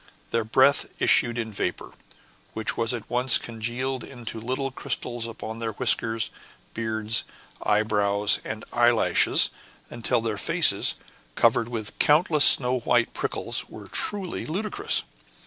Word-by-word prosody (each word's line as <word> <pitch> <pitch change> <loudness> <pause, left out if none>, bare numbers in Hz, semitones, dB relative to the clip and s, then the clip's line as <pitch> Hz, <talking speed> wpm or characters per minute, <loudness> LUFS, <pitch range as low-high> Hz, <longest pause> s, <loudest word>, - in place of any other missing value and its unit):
Their 115 -1 0
breath 130 +5 +3
issued 120 0 +3
in 110 -2 -4
vapor, 90 -3 -4 0.6
which 110 -2 -2
was 115 -1 -1
at 120 -4 -5
once 125 0 +4
congealed 120 +3 -4
into 120 -3 -8
little 130 +4 -3
crystals 120 -2 -3
upon 110 0 -8
their 115 -1 -3
whiskers, 115 -1 +1 0.4
beards, 110 0 -2 0.4
eyebrows, 105 -1 +1
and 110 0 -6
eyelashes, 120 -1 +4 0.4
until 120 +1 -1
their 110 -3 -3
faces, - - +3 0.4
covered 115 0 +2
with 110 -3 -6
countless 150 0 +4
snow 125 -1 +5
white 120 0 +1
prickles, - - -3
were - - -11
truly 195 -4 -2
ludicrous. 200 +7 -1
115 Hz, 125 wpm, -25 LUFS, 110-125 Hz, 0.6 s, snow